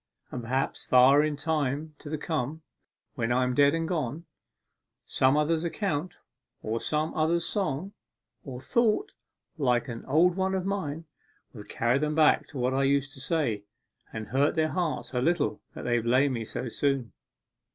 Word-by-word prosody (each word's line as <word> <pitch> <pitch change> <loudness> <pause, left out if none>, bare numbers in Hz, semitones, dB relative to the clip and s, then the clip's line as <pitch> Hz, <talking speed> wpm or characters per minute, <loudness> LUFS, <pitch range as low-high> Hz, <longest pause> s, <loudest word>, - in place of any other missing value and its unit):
And 125 - -4
perhaps, 130 +4 -2
far 130 +3 +6
in 155 -1 0
time 150 0 -1
to 155 0 -5
come, 155 0 -3 0.5
when 115 +1 -2
I 130 +1 +3
am 125 0 0
dead 145 +3 +4
and 165 0 -1
gone, 155 -2 -3 0.8
some 130 +2 +2
other's 160 +2 +1
accent, 175 -2 -2 0.5
or 110 +2 -2
some 155 +1 -1
other's 165 +2 +1
song, 190 0 -2 0.5
or 130 -3 -7
thought, 235 - +1 0.5
like 125 -2 +2
an 115 -1 -6
old 170 +5 +4
one 190 0 0
of 185 -1 -2
mine, 165 -6 -3 0.5
will 110 - -9
carry 120 +3 +1
them 150 +1 -1
back 155 -1 +4
to 145 - -9
what 125 +1 0
I 135 - +1
used 140 0 +1
to 140 - -11
say, 130 -7 -1 0.5
and 110 -1 -6
hurt 140 +7 +2
their 160 -1 +2
hearts 155 -9 -2
a 125 - 0
little 165 +1 +1
that - - -7
they 120 -1 +1
blamed 130 +4 +2
me 115 -2 -3
so 125 - -5
soon. 135 0 -1
145 Hz, 170 wpm, -28 LUFS, 125-160 Hz, 0.8 s, far